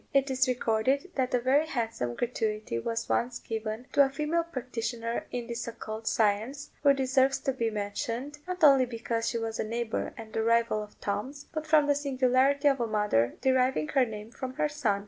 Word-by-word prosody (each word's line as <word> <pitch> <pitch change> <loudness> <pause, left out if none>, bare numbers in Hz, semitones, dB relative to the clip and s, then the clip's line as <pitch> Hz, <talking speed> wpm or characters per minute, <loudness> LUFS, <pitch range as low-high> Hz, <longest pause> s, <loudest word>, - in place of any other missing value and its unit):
It 275 0 +3
is 260 +1 +2
recorded 255 +7 +1
that 255 -2 0
a - - +3
very 275 +6 +3
handsome 225 - -2
gratuity 215 - -2
was 230 - -3
once 245 0 0
given 220 +1 -4
to 285 - +7
a 270 - +1
female 300 +5 0
practitioner 240 -5 -4
in 245 -1 -4
this 235 -1 -5
occult 220 -1 -6
science, 225 +7 0
who 285 -1 +6
deserves 265 0 +2
to 270 - 0
be 230 -3 0
mentioned, 230 +7 -4
not 365 -1 -4
only 270 -4 +7
because 230 -1 -2
she 235 - -2
was 225 -1 -3
a - - +1
neighbour 230 +1 -2
and 220 -1 -9
a 225 - +1
rival 230 -1 +2
of 210 0 -11
Tom's, 260 +8 -3
but 310 -1 -4
from 310 -1 +5
the 290 - +3
singularity 275 0 +2
of 275 -2 +3
a 235 - 0
mother 210 - +1
deriving 260 -11 +2
her 270 -2 +4
name 215 -2 -6
from 260 0 -6
her 300 - +1
son. 255 -10 0
245 Hz, 195 wpm, -29 LUFS, 225-275 Hz, -, to